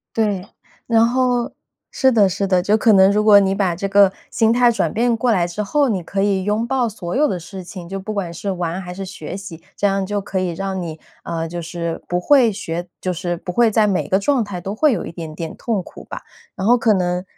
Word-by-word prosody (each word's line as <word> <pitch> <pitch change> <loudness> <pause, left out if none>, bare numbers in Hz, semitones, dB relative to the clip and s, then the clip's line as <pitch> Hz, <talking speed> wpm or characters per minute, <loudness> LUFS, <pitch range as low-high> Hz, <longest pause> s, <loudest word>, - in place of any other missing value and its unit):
对， 205 -4 0 0.4
然 230 0 +4
后 245 -1 0 0.4
是 265 - +3
的 210 -5 +4
是 200 +2 -2
的。 185 -2 +2
就 205 +3 +3
可 220 0 +4
能 190 -1 +6
如 210 +1 +2
果 210 -1 +7
你 195 -1 +2
把 190 -4 0
这 195 +3 -2
个 200 -1 +5 0.2
心 225 0 +2
态 245 0 +4
转 - - -1
变 235 +1 +1
过 245 +2 +1
来 180 -6 +2
之 175 +5 -4
后， 285 +7 +1
你 195 -6 -1
可 195 +4 -2
以 195 -2 +1
拥 210 +4 0
抱 250 -1 0
所 180 -5 -6
有 300 +3 +3
的 185 - -2
事 185 +3 -9
情。 175 -1 -9
就 195 +1 -5
不 215 +3 -5
管 185 -5 -3
是 195 +4 -4
玩 175 -1 -3
还 180 - -7
是 195 +2 -6
学 180 -2 -7
习， 180 -5 -9
这 205 - +1
样 195 0 0
就 205 +1 -2
可 190 -1 -3
以 185 -1 -1
让 190 +2 -4
你， 160 -2 -6 0.3
嗯， 165 -1 -3
就 175 0 -5
是 170 0 -5
不 175 - 0
会 255 +1 +5
学 175 -3 -5
就 185 - -2
是 175 +1 -3
不 180 - -6
会 230 +3 +3
在 215 0 +3
每 195 -3 -1
个 190 - +3
状 265 +4 +1
态 200 -4 -6
都 195 +4 -5
会 300 +5 +3
有 - - -2
一 - - -7
点 160 -2 -7
点 165 0 -6
痛 220 -6 -2
苦 - - -12
吧。 - - -8 0.3
然 190 - -3
后 240 +2 +6
可 230 -2 +3
能 180 -1 0
195 Hz, 270 characters per minute, -20 LUFS, 180-220 Hz, 0.4 s, 果